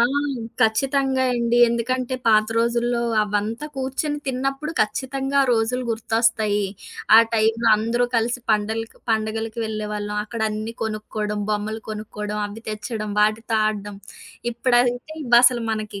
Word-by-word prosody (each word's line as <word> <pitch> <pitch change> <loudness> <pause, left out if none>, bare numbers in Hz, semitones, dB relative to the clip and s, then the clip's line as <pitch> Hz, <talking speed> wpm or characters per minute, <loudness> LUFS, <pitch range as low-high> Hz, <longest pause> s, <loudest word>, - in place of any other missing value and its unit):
ఆ! - - +6 0.6
ఖచ్చితంగా 265 +3 +2
ఎండి. 235 0 +1
ఎందుకంటే, 255 +2 -1
పాత 215 -1 +5
రోజుల్లో 235 +1 +1 0.2
అవంతా 210 +6 -2
కూర్చొని 275 +3 -2
తిన్నప్పుడు 270 +4 -2
ఖచ్చితంగా 270 +5 -1
ఆ - - +1
రోజులు 235 +2 +1
గుర్తొస్తాయి. 220 -2 +1 0.5
ఆ - - +10 0.2
టైమ్‌లో 225 +1 +2
అందరూ 230 +3 0
కలిసి 240 +2 0
పండలకి 220 +1 -1
పండగలకి 220 +1 -1
వెళ్ళేవాళ్ళం. 210 -1 -4
అక్కడన్నీ 220 0 -3
కొనుక్కోడం, 215 -1 -3
బొమ్మలు 215 +1 -2
కొనుక్కోడం, 210 0 -5
అవి 215 +2 -10
తెచ్చడం, 215 0 -4
వాటితో 220 +2 +1
ఆడడం. 205 -1 -3 0.6
ఇప్పుడైతే 245 +4 +1
ఇవసలు 240 0 +5
మనకి 215 -2 -4
225 Hz, 115 wpm, -22 LUFS, 215-245 Hz, 0.6 s, ఆ